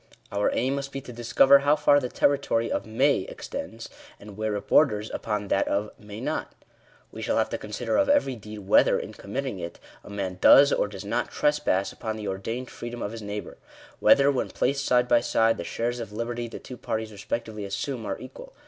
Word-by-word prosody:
Our 100 0 +1
aim 130 +3 +1
must 140 0 -4
be 135 - -4
to 125 - -10
discover 120 +4 +5
how 145 +2 +3
far 145 -1 +4
the 125 -3 -4
territory 130 -5 +1
of - - -2
may 130 +5 +3
extends, 95 - -7 0.3
and 100 0 -11
where 110 0 -2
it 100 - -5
borders 105 +1 +3
upon 105 -2 -3
that 100 - +2
of 105 +2 -1
may 105 0 -9
not. 150 +6 -3 0.6
We - - -8
shall - - 0
have - - +2
to - - -3
consider - - -2
of 290 -1 +3
every 285 - +3
deed, 105 -1 -9
whether, - - +5
in - - -6
committing 125 0 -4
it, 85 0 -7 0.2
a - - -12
man 95 -3 -4
does, 140 +1 +8
or - - +1
does 100 -1 -9
not, 120 +4 -1
trespass 150 -10 +1
upon 110 -1 -4
the 105 -1 -5
ordained 115 +6 -4
freedom 120 0 -6
of 100 - -3
his 115 0 -7
neighbour 105 0 -6 0.2
— - - -22
whether, 140 0 +6
when 130 - -1
placed 140 +1 0
side 125 0 +3
by 120 -1 +5
side, 115 -1 +2
the - - -4
shares 120 +7 -2
of 115 -3 -6
liberty 120 +2 -3
the 115 - -8
two 125 - -10
parties 110 -1 -3
respectively 105 +1 -5
assume 115 +5 -4
are - - -2
equal. - - -11
115 Hz, 210 wpm, -26 LUFS, 105-135 Hz, 0.6 s, does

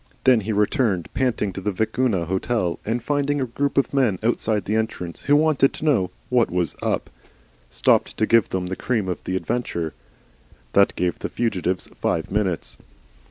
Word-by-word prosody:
Then 130 -3 +6
he 110 +1 -3
returned 105 - +1
panting 115 -7 0
to 95 - -6
the 105 - -1
Vicuna 110 -2 0
Hotel, 95 +1 -1
and 115 +2 -2
finding 145 +1 0
a 130 - 0
group 140 +4 -2
of 140 - +2
men 125 -9 +2
outside 110 -3 0
the 105 - 0
entrance, 110 -6 -3
who 145 - +3
wanted 150 -3 +3
to - - -6
know 115 - +3 0.2
what 125 -2 +3
was 90 -2 -1
UP, - - -1 0.6
stopped - - +2
to 110 - +2
give 115 -1 +4
them 95 -1 -2
the 95 +1 -3
cream 110 -4 -1
of 90 - -3
the 95 - -2
adventure. 85 -6 -2 0.8
That 100 - +4
gave 90 -1 -1
the - - -4
fugitives 95 -5 -1
five 80 - -1
minutes. 90 - -1
110 Hz, 175 wpm, -23 LUFS, 90-125 Hz, 0.8 s, Then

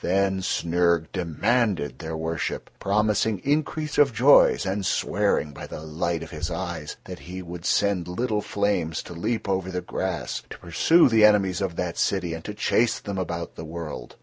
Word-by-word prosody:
Then 95 +1 +1
Snyrg 85 -2 +1
demanded 95 - 0
their 80 -1 -5
worship, 80 +1 -3
promising 105 +1 +1
increase 150 +1 0
of 145 -2 +6
joys, 135 -2 +6
and 95 +1 -1
swearing 75 -3 +1
by - - -8
the - - -7
light 80 +2 -2
of 80 - -10
his 80 +1 -4
eyes 85 0 -4
that 90 -1 -8
he 90 +1 -8
would 85 0 -8
send 100 -4 +1
little 105 +4 -1
flames 100 -7 -1
to - - -9
leap 110 +7 -2
over 95 -1 -1
the 90 -1 -2
grass, - - -3
to - - -8
pursue 160 - +4
the 115 -3 +4
enemies 100 -3 +4
of 95 -4 -2
that 90 -1 -3
city 90 -4 0
and 80 0 -6
to 105 - -5
chase 115 +2 +2
them 100 -2 -4
about 85 -2 -4
the - - -7
world. 80 -2 -7
95 Hz, 175 wpm, -25 LUFS, 85-105 Hz, -, of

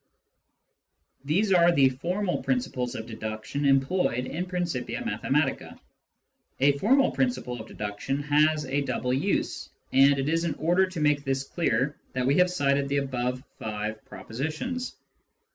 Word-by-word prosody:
These 190 +7 +2
are 175 -1 +6
the 140 -5 +5
formal 180 +9 -2
principles 130 - -1
of 110 - -5
deduction 110 +5 -4
employed 135 -2 +2
in 175 +7 -4
Principia 175 -8 -3
Mathematica. - - -1 0.8
A 140 +2 +5
formal 265 - +4
principle 180 - -1
of 110 - -11
deduction 105 +7 -4
has 150 +1 +3
a 135 +2 0
double 125 -2 -1
use, 175 +10 -1 0.2
and 135 +1 +6
it 135 0 -1
is 165 +2 +1
in 165 -4 -1
order 175 +4 +2
to 185 -3 -6
make 150 -1 +2
this 135 -1 -1
clear 140 -2 0 0.2
that 130 -1 -1
we 135 - +3
have 180 - +6
L - - -5
cited 140 -4 +1
the 140 - +1
above 125 -2 -2 0.2
five 110 0 -4
propositions. 160 - -4
140 Hz, 145 wpm, -27 LUFS, 130-175 Hz, 0.8 s, are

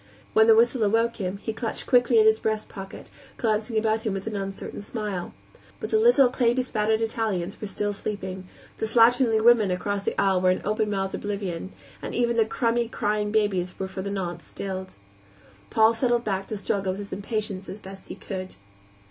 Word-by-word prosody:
When 220 0 +6
the 225 - +8
whistle 240 +2 +3
awoke 225 +3 +2
him, 190 -1 -3
he 220 - -2
clutched 230 0 -4
quickly 245 -1 +4
at 215 - +6
his 220 0 +5
breast 215 -1 -1
pocket, 195 0 -10 0.3
glancing 220 0 0
about 220 0 +1
him 215 -3 -2
with 195 - -5
an 220 -1 -4
uncertain 195 0 -5
smile. 205 -4 -4 0.5
But - - -5
the 435 - +4
little, 435 - +6
clay 240 -1 +2
bespattered 220 -4 0
Italians 215 -5 -2
were 210 - -3
still 205 +1 -2
sleeping, 190 -2 -5 0.3
the 220 - -1
slatternly 230 0 +4
women 230 -4 +6
across 200 +2 -1
the - - -2
aisle 190 -2 +3
were 185 - +4
in 185 - 0
open 215 +1 0
mouthed 195 -1 -2
oblivion, 195 -3 -4 0.3
and - - -5
even 235 -1 +1
the 225 -1 +4
crumby, 235 0 0
crying 210 -2 -1
babies 195 -4 0
were 190 - -3
for 190 0 -6
the 200 - -4
nonce 175 -4 -4
stilled. 190 -1 -6 0.7
Paul 220 +1 +5
settled 240 0 +1
back 195 -3 -2
to 215 - -4
struggle 195 -1 -1
with - - -7
his 200 - -8
impatience 200 -1 -4
as 195 - -6
best 195 -2 -12
he - - -7
could. 185 -2 -6
210 Hz, 195 wpm, -25 LUFS, 195-225 Hz, 0.7 s, the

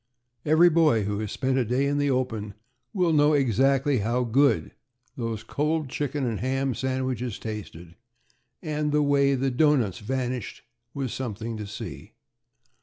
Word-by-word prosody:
Every 165 +3 +6
boy 155 -9 +3
who 100 +1 -2
has 110 -2 -4
spent 130 -1 0
a - - +2
day 125 +4 0
in 145 +1 0
the 145 0 +1
open 115 -6 -2 0.4
will 180 -6 +1
know 150 0 +4
exactly 135 +1 +2
how 120 +4 0
good 125 +1 +2 0.4
those 115 -5 -4
cold 150 +4 -1
chicken 145 0 -2
and 115 -4 -2
ham 135 +2 -1
sandwiches 130 -2 -2
tasted; 95 -6 -7 0.7
and 150 -2 -1
the 150 0 +3
way 140 -1 +3
the 135 +1 0
doughnuts 130 - +2
vanished 125 +1 -4 0.3
was 135 -4 -3
something 115 -2 -4
to 105 -1 -6
see. 105 +1 -8
130 Hz, 150 wpm, -26 LUFS, 115-145 Hz, 0.7 s, Every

